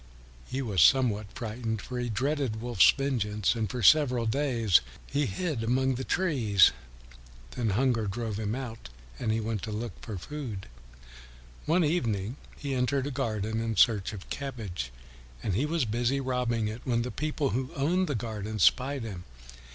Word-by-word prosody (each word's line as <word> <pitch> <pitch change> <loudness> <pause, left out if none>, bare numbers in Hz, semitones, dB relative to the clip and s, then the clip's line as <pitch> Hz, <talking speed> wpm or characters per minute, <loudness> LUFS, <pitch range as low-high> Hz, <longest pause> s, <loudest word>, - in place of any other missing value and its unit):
He 135 +1 -2
was 100 -8 +1
somewhat 110 - +4
frightened, 110 -1 -3
for 125 +4 -5
he 120 0 -2
dreaded 130 -1 -1
Wolf's 120 -4 +5
vengeance, 110 -7 +1
and 110 -4 -2
for 125 0 -4
several 125 -2 +5
days 115 -5 +3 0.2
he 145 0 0
hid 145 - -2
among 130 +3 +2
the 130 +1 -3
trees. 125 - +4 0.8
Then 115 - -1
hunger 115 +1 +1
drove 110 0 -3
him 110 +1 -2
out 115 - -7 0.3
and 110 - 0
he 110 - +1
went 110 -2 -2
forth 110 -2 -3
to - - -2
look 120 0 -5
for 110 -4 -6
food. 115 - -6 1.0
One 170 +3 +4
evening 120 - 0 0.2
he 140 -2 -3
entered 130 +1 +1
a 145 - -3
garden 110 -5 -2
in 115 -1 -2
search 105 -2 +4
of 100 -3 -9
cabbage, 110 - -4 0.5
and 100 - -1
he 130 +11 +1
was 160 -3 +1
busy 120 +5 0
robbing 125 -4 0
it, 110 +3 -5
when 120 -2 +1
the 125 - -4
people 150 -2 -1
who 130 +2 -2
owned 175 +7 +1
the 145 - -1
garden 110 -1 -4
spied 130 +6 +3
him. 95 -6 -7
120 Hz, 170 wpm, -29 LUFS, 110-135 Hz, 1.0 s, Wolf's